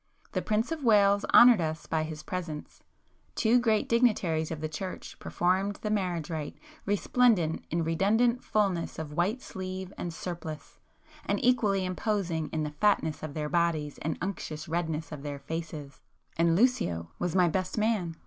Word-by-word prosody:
The -, -, -1 dB
Prince 215 Hz, +6 st, 0 dB
of 320 Hz, -3 st, -3 dB
Wales 205 Hz, -3 st, +4 dB
honoured 240 Hz, -5 st, +8 dB
us 160 Hz, 0 st, -3 dB
by 160 Hz, -, 0 dB
his 155 Hz, -1 st, -5 dB
presence: 160 Hz, -3 st, -6 dB, 0.5 s
two 235 Hz, +2 st, +4 dB
great 220 Hz, -3 st, +2 dB
dignitaries 200 Hz, -10 st, +2 dB
of 160 Hz, -, -4 dB
the 155 Hz, -, -2 dB
church 180 Hz, +4 st, -7 dB
performed 190 Hz, +3 st, 0 dB
the 210 Hz, -, -1 dB
marriage 180 Hz, -7 st, -1 dB
rite, 155 Hz, -2 st, -4 dB, 0.3 s
resplendent 205 Hz, -4 st, +2 dB
in 170 Hz, +1 st, 0 dB
redundant 220 Hz, +9 st, +2 dB
fulness 195 Hz, -6 st, 0 dB
of 155 Hz, -2 st, -6 dB
white 200 Hz, -, 0 dB
sleeve 185 Hz, 0 st, -6 dB
and 175 Hz, -, -3 dB
surplice, 165 Hz, -2 st, -7 dB, 0.5 s
and -, -, +1 dB
equally 210 Hz, -6 st, +3 dB
imposing 185 Hz, -4 st, -1 dB
in 155 Hz, -1 st, -2 dB
the 150 Hz, -, -3 dB
fatness 200 Hz, -7 st, +2 dB
of 155 Hz, -2 st, -6 dB
their 150 Hz, -1 st, -2 dB
bodies 160 Hz, -3 st, 0 dB
and 155 Hz, +1 st, -3 dB
unctuous 160 Hz, -5 st, -5 dB
redness 160 Hz, -1 st, -2 dB
of 150 Hz, -3 st, -6 dB
their 145 Hz, 0 st, -5 dB
faces; 155 Hz, -1 st, -6 dB, 0.3 s
and 165 Hz, 0 st, +3 dB
Lucio 190 Hz, -, +1 dB
was 175 Hz, -1 st, -1 dB
my 180 Hz, -2 st, +5 dB
'best 185 Hz, +4 st, -2 dB
man. 210 Hz, -7 st, 0 dB
175 Hz, 160 wpm, -29 LUFS, 155-205 Hz, 0.5 s, honoured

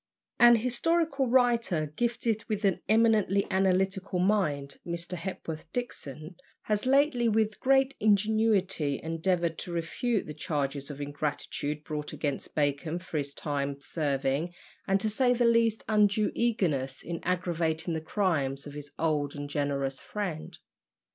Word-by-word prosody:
An 240 Hz, 0 st, +8 dB
historical 275 Hz, +4 st, +1 dB
writer, 235 Hz, -, +2 dB
gifted 230 Hz, -1 st, 0 dB
with 210 Hz, -1 st, -1 dB
an 195 Hz, -3 st, +1 dB
eminently 215 Hz, -3 st, +3 dB
analytical 190 Hz, 0 st, +1 dB
mind, 175 Hz, -8 st, +1 dB
Mr. 170 Hz, +1 st, -4 dB
Hepworth 165 Hz, -3 st, -6 dB
Dixon, 160 Hz, -, -5 dB, 0.3 s
has 210 Hz, +3 st, -1 dB
lately, 270 Hz, -3 st, +3 dB
with 215 Hz, -1 st, +1 dB
great 270 Hz, 0 st, +3 dB
ingenuity, 205 Hz, -7 st, +2 dB
endeavoured 165 Hz, +1 st, 0 dB
to 175 Hz, -, -6 dB
refute 180 Hz, +7 st, -1 dB
the 150 Hz, -, -6 dB
charges 145 Hz, -3 st, -3 dB
of 145 Hz, -1 st, -7 dB
ingratitude 145 Hz, +1 st, -3 dB
brought 150 Hz, 0 st, -5 dB
against 145 Hz, -3 st, -3 dB
Bacon 150 Hz, +2 st, 0 dB
for 170 Hz, -3 st, -4 dB
his 140 Hz, -1 st, -4 dB
time 140 Hz, -1 st, -2 dB
serving 145 Hz, +2 st, -1 dB, 0.3 s
and 195 Hz, 0 st, +3 dB
(to 215 Hz, -, 0 dB
say 245 Hz, +3 st, +2 dB
the 240 Hz, 0 st, +2 dB
least) 230 Hz, -2 st, +3 dB
undue 210 Hz, 0 st, +3 dB
eagerness 165 Hz, -, 0 dB
in 170 Hz, -1 st, -4 dB
aggravating 170 Hz, -2 st, -1 dB
the 160 Hz, -, -2 dB
crimes 155 Hz, -7 st, 0 dB
of 145 Hz, -, -8 dB
his 145 Hz, -1 st, -8 dB
old 150 Hz, -3 st, 0 dB
and 145 Hz, 0 st, -6 dB
generous 140 Hz, -2 st, -1 dB
friend. 190 Hz, -7 st, -5 dB
180 Hz, 135 wpm, -29 LUFS, 150-220 Hz, 0.3 s, An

